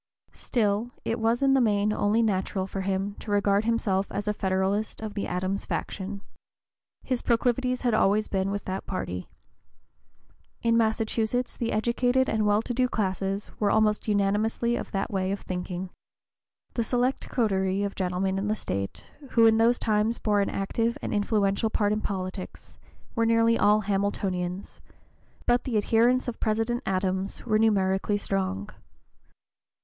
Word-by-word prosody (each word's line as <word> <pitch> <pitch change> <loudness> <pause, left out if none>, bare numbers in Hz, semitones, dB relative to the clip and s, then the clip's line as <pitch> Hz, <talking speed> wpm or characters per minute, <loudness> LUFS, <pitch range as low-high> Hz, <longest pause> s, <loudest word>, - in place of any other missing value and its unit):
Still 215 0 0 0.2
it 230 +1 -1
was 230 +3 +1
in 270 0 +5
the 270 - +4
main 210 -2 +2
only 215 +2 +2
natural 190 -2 0
for 195 0 -4
him 195 +1 -1
to - - -9
regard 205 0 +2
himself 205 -4 0
as 205 - -3
a 210 - +2
Federalist 195 +2 -1
of 220 -1 -5
the 205 - -3
Adams 185 +2 -2
faction. 200 0 -4 0.8
His 255 -2 -1
proclivities 250 +1 +1
had 245 -3 +1
always 215 0 +3
been 190 0 -1
with 200 +1 -3
that 190 +1 -4
party. 90 - -4 1.3
In 230 0 +3
Massachusetts 225 +2 0
the 230 - -2
educated 245 +4 +2
and 215 -1 +1
well 210 +1 +3
to 245 - -3
do 255 +1 +2
classes 195 -1 -2
were 205 - +2
almost 215 0 +2
unanimously 210 +3 +1
of - - -4
that 195 - -2
way 190 -1 0
of 200 - -3
thinking. 180 0 -5 0.8
The 235 - 0
select 250 +3 0
coterie 195 -4 +1
of 200 -1 -2
gentlemen 190 +1 -1
in 200 - -2
the 215 - +1
State, 100 - -4 0.3
who 230 -1 +6
in 225 0 +5
those 235 +2 +4
times 215 +1 +1
bore 205 -2 +1
an 200 - 0
active 230 +5 -1
and - - -2
influential 205 +1 +1
part 210 -1 +1
in 215 - -1
politics, 185 -1 -6 0.3
were 230 -1 +1
nearly 230 0 +4
all 210 -1 +4
Hamiltonians, 195 -2 -2 0.6
but 240 0 +3
the 240 -4 -1
adherents 235 +5 +3
of 240 - -4
President 225 +3 0
Adams 190 0 -1
were 215 -2 +2
numerically 200 -2 +2
strong. 95 - -2
210 Hz, 155 wpm, -27 LUFS, 195-230 Hz, 1.3 s, who